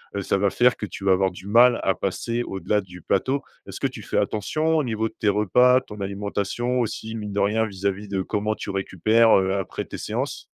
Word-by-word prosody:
heu, 100 - -1
ça 100 - 0
va 100 +1 +2
faire 125 0 +3
que - - -4
tu 100 - -8
vas 95 - +5
avoir 95 0 +2
du 90 +2 -11
mal 120 +3 +5
à 95 - +2
passer 115 +5 -2
au-delà 105 0 -1
du 90 -2 -13
plateau. 135 - 0 0.3
Est-ce - - -8
que - - +2
tu - - -9
fais - - -3
attention 155 +10 0
au 155 - +2
niveau 110 -2 -1
de - - -25
tes 105 - +2
repas, 125 +6 +4
ton 105 -5 -10
alimentation 100 +5 -2
aussi, 110 0 -4
mine 105 -2 -5
de 100 - -1
rien 110 +3 +2
vis-à-vis 100 -1 -3
de 95 -1 -1
comment 105 +2 -1
tu - - -7
récupères, 110 +4 +3
heu, 95 0 +1
après 95 -1 -3
tes - - -8
séances? - - -3
105 Hz, 225 wpm, -24 LUFS, 95-115 Hz, 0.3 s, vas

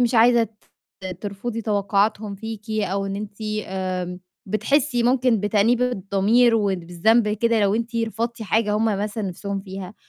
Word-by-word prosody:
مش 245 0 +2
عايزة 235 +1 +6
ت 210 -3 -15
ترفُضي 220 +3 -4
توقعاتهم 205 0 0
فيكِ 220 +1 -7
أو 200 -2 -1
إن 195 - -3
أنتِ 205 0 -7 0.3
آمم، 185 -1 -3 0.3
بتحسّي 245 +5 +1
ممكن 245 -2 +3
بتأنيب 210 +4 +2
الضمير 230 +1 +3
وال 200 -4 +1
بالذنب 210 +6 +3
كده 225 +1 +1
لو 200 0 +3
أنتِ 230 +1 -2
رفضتِ 230 +1 -2
حاجة 215 +1 +1
هُم 220 - +1
مثلًا 210 0 -1
نَفْسهم 195 +1 -4
فيها، 190 0 -8
215 Hz, 150 wpm, -23 LUFS, 195-230 Hz, 0.3 s, عايزة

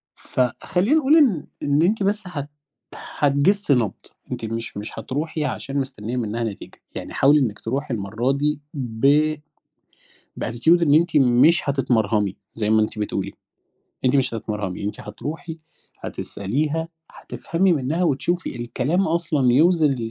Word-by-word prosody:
فخلّينا 180 - 0
نقول 290 +1 +4
إن 240 - +3 0.2
إن 145 +2 +2
أنتِ 205 +4 +2
بس 205 +2 0
هت 145 -5 -5 0.5
هتجِسي 145 +4 +2
نَبْض، 115 -5 0 0.4
أنتِ - - -4
مش 115 0 -5
مش 105 +2 -6
هتروحي 150 +6 -3
عشان 135 +1 -4
مستنيّة 125 -4 -3
منها 115 -1 -2
نتيجة، 105 -3 -7
يعني - - -7
حاولي 145 +2 +5
إنِّك 115 -6 -1
تروحي 135 +2 -3
المرّة 110 +6 -1
دي 145 +1 -1
ب 140 +5 +2 1.1
بattitude 160 +9 +3
إن 145 -2 +4
أنتِ 170 0 +3
مش 140 +4 +4
هتتمرهمي، 110 -7 +1 0.2
زي 110 -1 -1
ما 110 0 +4
أنتِ 110 - -3
بتقولي، 100 -2 -3 0.7
أنتِ 130 - +3
مش 135 -3 +1
هتتمرهمي، 105 -4 -4
أنتِ 105 - -4
هتروحي، 160 +1 -7 0.4
هتسأليها، 150 +11 -2 0.2
هتفهمي 180 +1 -1
منها، 150 +5 -1
وتشوفي 170 +3 -1
الكلام 135 +10 -1
أصلًا 160 -6 +1
يوزن 155 -1 +4
140 Hz, 135 wpm, -22 LUFS, 115-160 Hz, 1.1 s, حاولي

